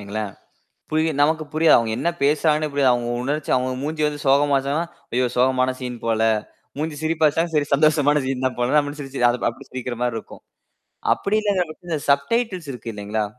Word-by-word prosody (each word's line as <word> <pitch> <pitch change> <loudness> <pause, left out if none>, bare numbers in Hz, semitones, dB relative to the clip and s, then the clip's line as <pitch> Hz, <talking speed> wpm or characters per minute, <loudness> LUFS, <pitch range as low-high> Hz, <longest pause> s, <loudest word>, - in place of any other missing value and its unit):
வைங்களேன். 105 0 -4 0.6
புரியும், 155 -1 +1
நமக்கு 155 +1 +2
புரியும். 160 +1 +5
அவங்க 115 -1 +1
என்ன - - 0
பேசுறாங்கன்னு 150 +1 +2
புரியும். 140 -2 +3
அவங்க 120 -1 -1
உணர்ச்சி, 145 +3 -2
அவங்க 130 0 0
மூஞ்சி 155 +1 -3
வந்து 145 -1 -3
சோகமாச்சுன்னா, 140 +2 +2 0.3
ஐயோ 125 0 +2
சோகமான 130 0 +2
சீன் 125 -2 -5
போல. 110 -1 +1 0.6
மூஞ்சி 155 -1 -3
சிரிப்பாச்சுன்னா, 160 +1 +1
சரி 145 -1 +2
சந்தோஷமான 150 -1 +3
சீன் 130 -1 -2
தான் 130 - -2
போல 125 +5 +2
அப்படின்னு 145 +1 -6
சிரிச்சு 135 -3 0
அது 120 - -2
அப்படி 115 - -14
சிரிக்கிற 125 -1 -5
மாரி 120 -2 0
இருக்கும். - - -12 0.7
அப்படி 205 +2 -1
இல்லாங்கற 195 -4 +1
பட்ச்ச 175 +2 -13
இந்த 155 - -1
சப்டைட்டில்ஸ் 180 - 0
இருக்கு 115 -2 -7
இல்லீங்களா? 105 +1 -2
145 Hz, 175 wpm, -22 LUFS, 125-155 Hz, 0.7 s, புரியும்